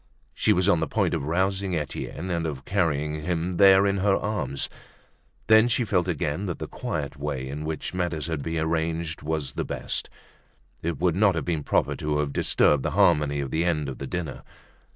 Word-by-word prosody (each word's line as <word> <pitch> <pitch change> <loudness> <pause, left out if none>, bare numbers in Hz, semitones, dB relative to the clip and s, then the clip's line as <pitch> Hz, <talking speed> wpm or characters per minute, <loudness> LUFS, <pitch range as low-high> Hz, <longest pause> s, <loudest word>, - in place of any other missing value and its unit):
She - - +2
was 90 +1 +3
on 90 -5 +4
the 80 - -1
point - - 0
of 70 - -1
rousing 95 +3 0
Etienne 80 +3 -4
and 85 -1 -1
of 70 -3 -6
carrying 75 -5 0
him 85 +2 -2
there 95 0 +7
in 100 0 +1
her 95 0 +3
arms. 80 -11 -2 0.8
Then 110 +1 +6
she 120 +1 +1
again 90 -7 0
felt - - -3
that 90 - -3
the - - -5
quiet 75 -1 -4
way 70 -2 -3
in 75 +3 -5
which 80 +1 -4
matters 85 -4 -2
had 80 -3 -3
been 80 +3 -3
arranged 80 0 -1
was 75 -3 -2
the - - -3
best. - - -3 0.7
It 85 -2 -2
would 90 0 +1
not 100 -1 +4
have 80 - -2
been 85 -3 -1
proper - - +1
to 75 0 -1
have 75 -1 -1
disturbed 75 -2 +3
the - - -1
harmony 75 -7 +3
of 70 - -4
the 80 - +1
end 80 -4 0
of 70 - -6
the 70 - -5
dinner. 85 -3 -4
80 Hz, 200 wpm, -26 LUFS, 75-90 Hz, 0.8 s, there